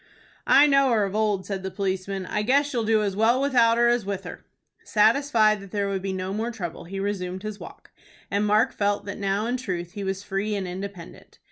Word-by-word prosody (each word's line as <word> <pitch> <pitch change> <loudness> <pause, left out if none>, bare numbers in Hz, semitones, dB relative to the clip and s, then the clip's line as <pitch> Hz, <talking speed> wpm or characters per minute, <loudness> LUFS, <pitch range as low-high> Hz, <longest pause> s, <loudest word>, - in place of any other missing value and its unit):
"I 285 - +7
know 275 -2 +4
her 220 -3 +3
of 195 -1 -3
old," 210 -3 0
said 195 -2 -4
the 190 - -4
policeman. 190 0 -3
"I 210 - -2
guess 280 +6 +2
you'll 235 -2 0
do 220 -1 +3
as 200 -2 -2
well 225 +4 +3
without 240 -4 +3
her 240 0 +4
as 240 -1 +2
with 195 -1 -4
her." 180 - -9 0.4
Satisfied 220 -1 +3
that 200 - -11
there 200 0 -1
would 195 -1 -2
be 195 0 -3
no 185 0 -3
more 220 +3 -2
trouble, 175 -9 -6
he 195 +3 -6
resumed 190 -2 -3
his 215 -1 -6
walk, - - -12 0.4
and 200 +1 +1
Mark 215 +5 +3
felt 205 0 -1
that 200 0 -6
now 200 +1 0
in 245 +2 -1
truth 180 -8 -4
he 200 +1 -6
was 195 0 -3
free 205 +2 -2
and 195 -2 -3
independent. 185 -1 -9
205 Hz, 225 wpm, -25 LUFS, 195-225 Hz, 0.4 s, I